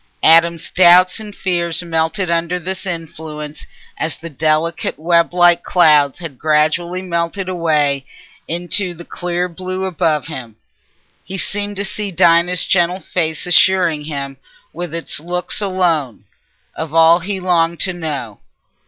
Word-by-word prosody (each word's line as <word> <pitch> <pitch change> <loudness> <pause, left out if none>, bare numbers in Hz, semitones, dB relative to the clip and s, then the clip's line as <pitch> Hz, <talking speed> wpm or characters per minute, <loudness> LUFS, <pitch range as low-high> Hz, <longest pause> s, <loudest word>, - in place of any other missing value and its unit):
Adam's 165 0 +4
doubts 180 +2 +5
and 210 -2 -9
fears 170 -2 -1
melted 170 +3 -1
under 170 +1 0
this 190 +2 -5
influence 155 -3 -7 0.3
as 160 -1 -1
the 165 0 -9
delicate 155 +3 -1
weblike 175 +1 +3
clouds 150 -7 +3
had 165 -7 -8
gradually 160 +4 +1
melted 170 +2 -2
away 150 -6 0 0.4
into 175 +2 -1
the 170 +1 -11
clear 175 0 -3
blue 185 +2 -5
above 165 -5 0
him. 125 -8 -8 0.7
He 195 - -6
seemed 205 +2 -3
to 200 +1 -3
see 205 +1 -4
Dinah's 170 0 +3
gentle 180 0 +1
face 160 -4 -2
assuring 175 -4 +3
him, 140 -3 -5 0.4
with 175 -2 -6
its 165 -2 -2
looks 180 +5 -3
alone, 170 - -1 0.5
of 160 0 -6
all 165 +1 +6
he 190 +2 -4
longed 170 -2 +1
to 185 - 0
know. 150 - -5
170 Hz, 135 wpm, -17 LUFS, 160-180 Hz, 0.7 s, all